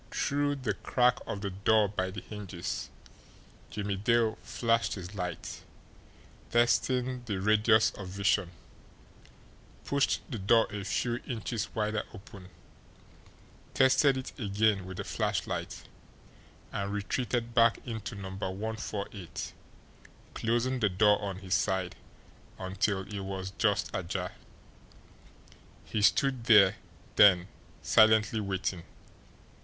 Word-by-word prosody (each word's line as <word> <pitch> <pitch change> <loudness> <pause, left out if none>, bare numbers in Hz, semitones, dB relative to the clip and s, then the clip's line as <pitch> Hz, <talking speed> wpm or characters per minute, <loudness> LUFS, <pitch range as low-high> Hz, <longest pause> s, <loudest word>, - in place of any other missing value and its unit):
Through 145 0 0
the 130 -5 -2
crack 125 0 +2
of 100 - -4
the 100 -1 -3
door 105 +3 +3
by 95 -2 -2
the 95 - -7
hinges, 100 -5 -6 0.8
Jimmie 100 -1 -3
Dale 110 +2 +2
flashed 115 -1 0
his 95 -1 -8
light, 90 -5 -5 0.9
testing 125 +2 +2
the 100 -5 -2
radius 110 +2 +4
of 95 - -8
vision, 100 -1 +1 1.4
pushed 140 0 +1
the 120 -7 -5
door 115 +4 +4
a 105 -1 -4
few 120 +3 -1
inches 115 -2 -4
wider 105 0 0
open, 100 -2 -12 1.3
tested 135 +1 +4
it 130 - -6
again 105 -2 +1
with 95 -1 -7
the - - -3
flashlight - - -3 0.9
and 100 0 -3
retreated 115 +3 -2
back 115 -1 +5
into 110 -2 -5
No. 95 -1 -6
148, 100 -1 -5 0.8
closing 120 +3 0
the 105 -3 +2
door 105 +2 +3
on 100 -2 -3
his 95 -1 -4
side 95 -2 0 0.6
until 95 +1 -1
it 100 +1 -6
was 95 -1 -5
just 105 -2 +1
ajar. 90 0 -3 1.5
He 110 - -2
stood 130 +3 +2
there 100 -5 +6 0.4
then 95 -3 +6 0.3
silently 110 0 +5
waiting. 95 -3 -2
105 Hz, 115 wpm, -30 LUFS, 95-115 Hz, 1.5 s, there